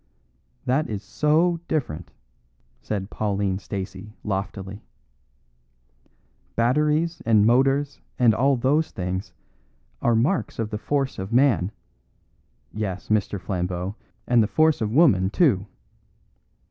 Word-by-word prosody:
"That 135 +5 +1
is 105 -2 -4
so 165 +3 +2
different," 90 - -2 0.7
said 100 -1 -4
Pauline 100 -2 -1
Stacey, 100 +1 -6
loftily. 100 0 -4 1.7
"Batteries 150 +7 +1
and 110 -2 +4
motors 135 +4 +2 0.2
and 120 -3 +5
all 135 +5 +3
those 145 +6 +2
things 95 0 -4 0.7
are 120 -1 +3
marks 140 +12 0
of 110 -1 -3
the 105 - -3
force 135 -1 -1
of 95 +3 -5
man 120 -7 +3 1.0
yes, 100 -3 -4
Mr. 105 -2 +1
Flambeau, 90 +1 -3 0.3
and 120 -2 +4
the 105 - +2
force 155 +4 +2
of 110 - 0
woman, 115 - +4
too! 105 - +2
110 Hz, 110 wpm, -24 LUFS, 100-140 Hz, 1.7 s, and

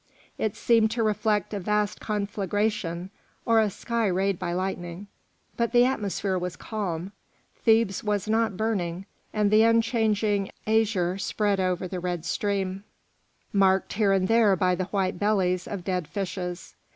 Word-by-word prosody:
It 220 -1 -1
seemed 225 -2 +3
to 230 - +2
reflect 215 -1 0
a 205 - -2
vast 210 +2 0
conflagration 205 -3 -2 0.3
or 230 -1 +4
a 215 -1 +3
sky 230 +3 -1
rayed 190 0 0
by 175 -2 -2
lightning, 180 0 -3 0.5
but 235 0 0
the 240 0 +6
atmosphere 200 -6 -1
was 180 0 -4
calm, 190 -4 -4 0.5
Thebes 220 -3 +2
was 210 -2 -1
not 220 -3 +1
burning, 190 -5 -2 0.3
and 210 -1 +1
the 215 +1 +6
unchanging 220 -3 +2 0.2
azure 205 -5 +1
spread 200 +1 0
over 185 0 0
the 180 0 -4
red 175 -2 -3
stream, 195 +1 -1 0.7
marked 190 -1 +3
here 205 -1 +2
and 190 -1 +2
there 225 -3 +4
by 180 0 +2
the 180 +1 -1
white 190 -2 -1
bellies 185 -4 +1
of 200 -4 -5
dead 180 -3 -2
fishes. 180 -2 -5
200 Hz, 150 wpm, -26 LUFS, 185-215 Hz, 0.7 s, the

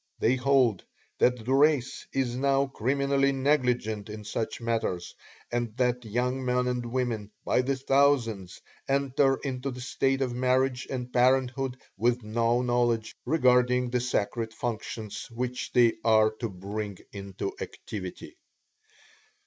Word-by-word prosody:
They 120 +3 +2
hold 125 -5 +2 0.4
that 125 -3 +2
the 130 - +1
race 140 -2 +2
is 130 -3 -1
now 135 +1 +2
criminally 140 +2 +1
negligent 125 -6 0
in 105 0 -7
such 110 +2 -3
matters, 115 -7 -2 0.4
and 120 -1 -2
that 125 -1 +1
young 125 +4 -1
men 125 0 +1
and 125 -1 -1
women, 120 -4 -2 0.2
by - - +3
the 135 +2 0
thousands, 130 -8 +1 0.3
enter 135 0 +2
into 135 -1 -3
the 125 -1 -7
state 135 +1 0
of 125 -2 -2
marriage 130 0 +1
and 125 -2 -5
parenthood 130 +1 +2 0.2
with 120 +3 +1
no 115 +3 +1
knowledge 120 -2 +1
regarding 125 -4 +3
the 125 - +1
sacred 115 -2 -2
functions 110 -2 -5
which 125 +1 -4
they 120 -2 +5
are 110 -1 +5
to 115 - -2
bring 100 +1 -5 0.2
into 100 -1 -5
activity. 95 -4 -7
125 Hz, 135 wpm, -28 LUFS, 115-130 Hz, 0.4 s, they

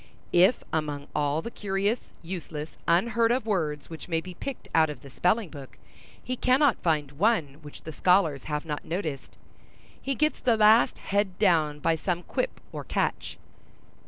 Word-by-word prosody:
If 185 +7 +5
among 150 -2 -2
all 150 +2 0
the 235 - -5
curious, 200 +3 -1 0.2
useless, 165 -3 -6 0.2
unheard 230 +7 +3
of 245 -2 0
words 155 -9 -1
which 160 -3 -9
may 165 -2 0
be 180 +2 -9
picked 265 +8 -7
out 160 -1 +4
of 150 - -8
the 140 - -12
spelling 190 - +1
book, 140 -4 -11 0.5
he 255 - -3
cannot 255 +1 +3
find 150 -5 0
one 155 -4 +1
which 145 -1 -12
the 160 - -6
scholars 180 -7 +2
have 150 +1 -3
not 150 -2 -4
noticed, 160 -6 -5 0.6
he 275 0 -2
gets 305 +4 +1
the 235 -3 +2
last 215 +2 +5
head 200 -2 -1
down 155 -4 +3
by 165 +2 +1
some 175 +2 -2
quip - - -3
or - - -6
catch. - - -2
175 Hz, 165 wpm, -27 LUFS, 150-215 Hz, 0.6 s, If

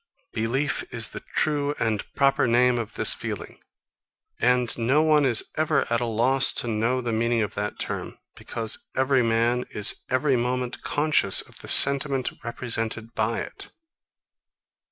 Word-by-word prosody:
Belief 130 +6 -1
is 115 -3 -1
the - - -7 0.2
true 145 -1 0
and 110 -2 -1
proper 135 -2 +2
name 120 +1 +2
of 110 -3 -7
this - - +5
feeling; - - -7 0.8
and 125 -1 +2
no 130 +6 +1
one 155 -2 +3
is 120 -4 +3
ever 155 0 +1
at 120 +1 +1
a - - -1
loss 130 +4 +3
to - - -1
know 115 +3 -1
the 120 -2 -3
meaning 115 0 0
of 105 - -5
that 105 0 -4
term; - - -5 0.2
because 110 -1 -3
every 130 0 +2
man 115 +1 +1
is 105 - +2
every 130 +1 +1
moment 125 0 -3
conscious 145 -10 +2
of - - -14
the - - -11
sentiment 140 -2 +4
represented 115 -1 -3
by 110 +1 -1
it. - - -7
120 Hz, 155 wpm, -24 LUFS, 115-135 Hz, 0.8 s, this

